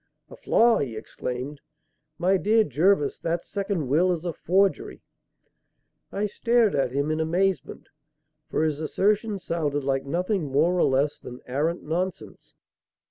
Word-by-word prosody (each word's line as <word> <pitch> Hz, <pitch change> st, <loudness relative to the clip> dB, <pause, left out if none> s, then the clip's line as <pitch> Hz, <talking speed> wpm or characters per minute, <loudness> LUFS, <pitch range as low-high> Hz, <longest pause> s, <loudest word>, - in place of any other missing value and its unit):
"A -, -, -9 dB
flaw!" 235 Hz, 0 st, +3 dB
he 120 Hz, -6 st, -3 dB
exclaimed. 125 Hz, +5 st, -6 dB, 0.6 s
"My 185 Hz, +3 st, +2 dB
dear 220 Hz, +4 st, +3 dB
Jervis, 155 Hz, -, +1 dB
that 170 Hz, +1 st, -2 dB
second 195 Hz, -7 st, -3 dB
will 165 Hz, +8 st, +3 dB
is 175 Hz, -1 st, -3 dB
a 170 Hz, -, -2 dB
forgery." 195 Hz, +5 st, 0 dB, 1.1 s
I 205 Hz, +1 st, -1 dB
stared 230 Hz, +1 st, +2 dB
at 135 Hz, -3 st, 0 dB
him 140 Hz, +3 st, -1 dB
in 155 Hz, -, -1 dB
amazement; 180 Hz, +4 st, -1 dB, 0.6 s
for -, -, 0 dB
his 155 Hz, -2 st, 0 dB
assertion 205 Hz, +6 st, 0 dB
sounded 150 Hz, -6 st, -2 dB
like 135 Hz, 0 st, 0 dB
nothing 180 Hz, +4 st, -1 dB
more 155 Hz, +6 st, +3 dB
or 180 Hz, -, +3 dB
less 140 Hz, +2 st, +1 dB
than 125 Hz, 0 st, -10 dB
arrant 150 Hz, +7 st, -1 dB
nonsense. 165 Hz, -, -4 dB
165 Hz, 140 wpm, -25 LUFS, 145-195 Hz, 1.1 s, flaw